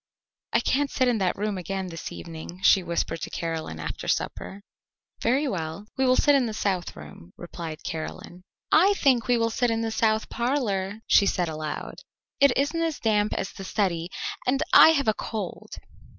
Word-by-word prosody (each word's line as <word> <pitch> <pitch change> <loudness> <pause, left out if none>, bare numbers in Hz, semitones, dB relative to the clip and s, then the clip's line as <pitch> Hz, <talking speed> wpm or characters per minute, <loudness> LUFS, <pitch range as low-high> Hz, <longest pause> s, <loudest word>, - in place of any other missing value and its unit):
"I - - +3
can't 280 +1 +1
sit 255 -1 +1
in 240 -3 +2
that 185 -2 0
room 205 -1 -2
again 190 +1 -4
this 165 -1 -7
evening," 170 +1 -9
she 190 - +6
whispered 170 -2 -2
to - - -4
Caroline 160 - -4
after 75 -1 -5
supper. 200 +1 -3 0.6
"Very 265 +6 +2
well, 165 -2 -4
we 265 0 +1
will 255 - +5
sit 290 - +4
in 270 -4 +3
the 220 - -5
south 190 -4 -2
room," 75 +3 -12
replied 165 -2 -7
Caroline. 165 +2 -6 0.3
"I 380 +6 +6
think 250 - +2
we 245 -1 +3
will 230 0 +1
sit 245 +2 +1
in 225 0 0
the 225 0 -2
south 220 0 +1
parlour," 220 -5 -1
she 200 - +5
said 175 -4 0
aloud; 155 -1 -5 0.4
"it 280 -1 +6
isn't 295 +5 0
as 325 -2 -1
damp 210 -2 +1
as 195 - -3
the 195 - -9
study, 180 -4 -1 0.4
and 270 +4 +2
I - - +10
have 280 -5 0
a 215 - +4
cold." 210 -4 -6
205 Hz, 185 wpm, -26 LUFS, 175-245 Hz, 0.6 s, I